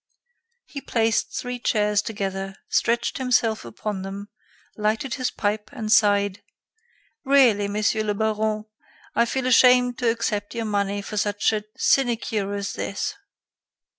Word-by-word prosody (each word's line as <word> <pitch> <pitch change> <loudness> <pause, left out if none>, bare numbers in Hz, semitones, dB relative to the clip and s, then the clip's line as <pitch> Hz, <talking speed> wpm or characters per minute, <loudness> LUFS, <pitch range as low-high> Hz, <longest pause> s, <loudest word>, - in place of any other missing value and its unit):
He 280 - -8
placed 225 -4 0
three 245 0 -5
chairs 210 -3 +1
together, 195 -3 -4
stretched 235 +2 +1
himself 245 -4 +1
upon 190 - -5
them, 200 +2 -7 0.5
lighted 220 +4 -1
his 255 -2 -1
pipe 210 0 -2
and 215 -1 -4
sighed: 205 -2 +3 0.8
"Really, 255 -8 +4
Monsieur 210 +1 0
le 210 -1 -1
Baron, 215 0 -1 0.5
I 235 - +3
feel 260 +2 -2
ashamed 250 0 +5
to 245 -2 +2
accept 220 -2 -2
your 230 -1 -2
money 200 -1 -1
for 210 - -6
such 205 +1 +1
a 210 -1 -2
sinecure 230 -6 +1
as 200 0 -3
this. 200 - -3
215 Hz, 135 wpm, -24 LUFS, 205-235 Hz, 0.8 s, ashamed